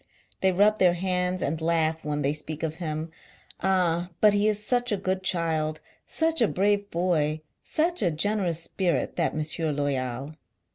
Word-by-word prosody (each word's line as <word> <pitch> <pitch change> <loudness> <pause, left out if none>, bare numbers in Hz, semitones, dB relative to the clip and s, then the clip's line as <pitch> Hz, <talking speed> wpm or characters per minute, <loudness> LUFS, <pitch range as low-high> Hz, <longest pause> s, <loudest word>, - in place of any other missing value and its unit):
They 190 - +3
rub 205 +4 +3
their 180 -2 +4
hands 180 0 -1
and 160 +3 -2
laugh 160 -1 +1
when 150 0 -2
they 140 +2 +1
speak 155 +1 -4
of 160 0 -2
him. 155 0 -3 0.5
Ah, 180 -2 +1
but 210 -1 +6
he 205 +1 +3
is 210 -1 -1
such 245 +1 +1
a 205 - +1
good 190 0 -1
child, 160 -4 0 0.3
such 325 -1 +1
a 230 - +5
brave 205 +1 +1
boy, 160 -4 0 0.2
such 340 +3 0
a 185 - +3
generous 170 0 -1
spirit, 170 -9 -1
that - - 0
Monsieur 155 +1 -1
Loyal! 140 -1 -2
175 Hz, 165 wpm, -26 LUFS, 155-200 Hz, 0.5 s, but